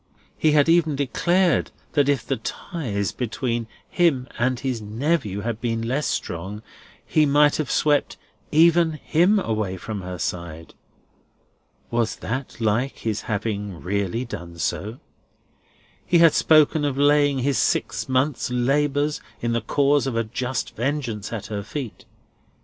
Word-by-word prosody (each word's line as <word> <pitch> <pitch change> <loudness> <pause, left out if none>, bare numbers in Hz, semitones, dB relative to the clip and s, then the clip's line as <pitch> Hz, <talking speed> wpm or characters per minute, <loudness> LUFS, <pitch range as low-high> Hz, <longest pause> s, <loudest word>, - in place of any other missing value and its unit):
He 155 -1 +2
had 145 -1 +4
even 165 -3 +3
declared 170 +7 +1 0.2
that 145 -2 +2
if 135 -5 +1
the - - -1
ties 110 - -3
between 120 -1 -2 0.2
him 145 -8 +1
and 125 +1 +1
his 130 -4 -2
nephew 110 - -1
had 115 0 -4
been 115 -1 -1
less 135 +5 0
strong, 95 +6 -4 0.4
he 155 -1 +3
might 145 +1 +4
have 155 -4 -2
swept 145 -2 +1 0.3
"even 165 +1 +5
him" 175 +6 +2
away 110 - -2
from 105 +2 -5
her 90 0 -6
side. 85 -2 -5 1.2
Was 115 -1 0
that 130 +2 -5
like 115 +4 0
his 110 -1 -2
having 105 -3 -3
really 100 +5 -2
done 85 -7 -8
so? 105 +7 -3 1.1
He 175 - +3
had 165 -2 +6
spoken 155 -1 +4
of 140 -2 -1
laying 145 0 +4
his 135 0 +1
six - - 0
months' 130 +1 +1
labours 145 +4 +1 0.2
in 120 - -1
the 115 0 0
cause 140 +4 +2
of 130 - -2
a 115 - +1
just 125 +2 -4
vengeance 120 -4 -2
at 115 -4 -5
her 105 -1 -4
feet. 120 +3 -7
125 Hz, 145 wpm, -23 LUFS, 110-145 Hz, 1.2 s, had